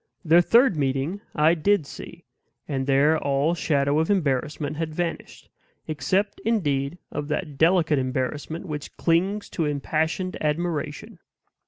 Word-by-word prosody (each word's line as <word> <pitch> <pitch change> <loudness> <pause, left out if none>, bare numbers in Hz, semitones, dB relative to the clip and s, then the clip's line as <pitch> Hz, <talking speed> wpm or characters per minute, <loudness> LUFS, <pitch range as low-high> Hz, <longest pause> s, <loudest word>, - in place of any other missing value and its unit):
Their 165 +2 +6
third 235 +3 +4
meeting 140 +6 -1
I 155 +2 +4
DID 175 0 +2
see; - - -10 0.4
and 135 -2 -2
there 145 +3 +4
all 140 +3 +1
shadow 145 -3 +1
of 160 - 0
embarrassment 150 -4 0
had 160 -1 -3
vanished, 170 -1 -4 0.4
except, 185 +7 -1
indeed, 150 -9 0
of 145 -1 -4
that 150 0 -3
delicate 160 -3 +4
embarrassment 130 +5 -3
which 150 -3 -7
clings 190 +5 +1
to 165 - -1
impassioned 160 +5 -1
admiration. 150 -1 -2
155 Hz, 130 wpm, -24 LUFS, 145-175 Hz, 0.4 s, Their